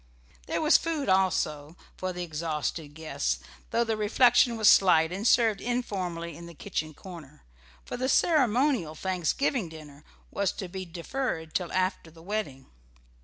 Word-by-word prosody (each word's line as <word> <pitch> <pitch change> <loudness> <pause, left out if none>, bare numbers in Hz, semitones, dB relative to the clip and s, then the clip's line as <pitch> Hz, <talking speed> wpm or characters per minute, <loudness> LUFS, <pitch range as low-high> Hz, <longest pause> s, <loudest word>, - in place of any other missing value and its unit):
There - - -1
was 305 - +6
food, 310 -6 -2
also, 165 -5 +1 0.2
for 185 0 -3
the 180 0 -5
exhausted 155 -2 -4
guests, 155 - -2 0.3
though 235 - +2
the 225 -1 -1
refection 235 +3 +4
was 215 -2 +3
slight 165 -5 +6
and 200 +5 -1
served 225 -5 +3
informally 185 -9 -3
in 170 +2 -10
the 170 - -12
kitchen 155 +1 -4
corner, 160 -6 -12 0.4
for - - -5
the 255 +1 -1
ceremonial 255 - +2
Thanksgiving 185 - -1
dinner 150 -2 -12 0.3
was 200 -1 0
to 190 - -6
be 185 +1 -6
deferred 170 -1 -4
till 180 -2 -2
after 185 -2 -1
the 165 0 -16
wedding. 185 -10 -4
185 Hz, 150 wpm, -28 LUFS, 160-225 Hz, 0.4 s, was